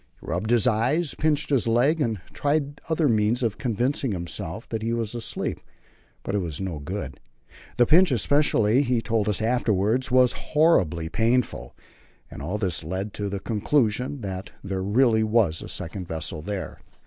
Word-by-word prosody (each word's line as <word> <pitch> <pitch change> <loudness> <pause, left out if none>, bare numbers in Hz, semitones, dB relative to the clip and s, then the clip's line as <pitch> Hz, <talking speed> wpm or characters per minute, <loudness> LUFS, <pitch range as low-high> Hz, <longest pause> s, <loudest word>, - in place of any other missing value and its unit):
He - - -15
rubbed 90 +6 -2
his 120 -3 +3
eyes, 135 +9 +1
pinched 150 -1 0
his 130 -5 +2
leg, 130 +8 +3
and 115 -7 0
tried 145 0 -1
other 160 -1 +2
means 110 +1 +2
of 115 -3 -1
convincing 125 +1 0
himself 85 +3 -5
that 110 -1 -3
he 115 +1 -1
was 115 -2 -2
asleep, 120 -2 -3 0.6
but 100 - -4
it 105 - +2
was 85 -6 -4
no 90 -5 -4
good. 70 -2 -6 0.6
The 120 - +5
pinch 170 +5 +5
especially, 125 -2 +3
he 125 -3 +1
told 110 -2 0
us 105 +1 -1
afterwards, 115 0 +1
was 125 -1 +5 0.3
horribly 85 - +3
painful, 115 +7 0 0.6
and - - -8
all 90 +9 -3
this 95 -6 -1
led 95 +5 -3
him 105 - -9
to 100 0 -4
the 100 0 -3
conclusion 120 +4 0
that 95 0 -5
there 95 -1 -3
really 110 +3 +3
was 110 -7 +2
a - - -8
second 90 +2 -6
vessel 80 -1 -4
there. 100 +2 -5
110 Hz, 170 wpm, -25 LUFS, 95-125 Hz, 0.6 s, The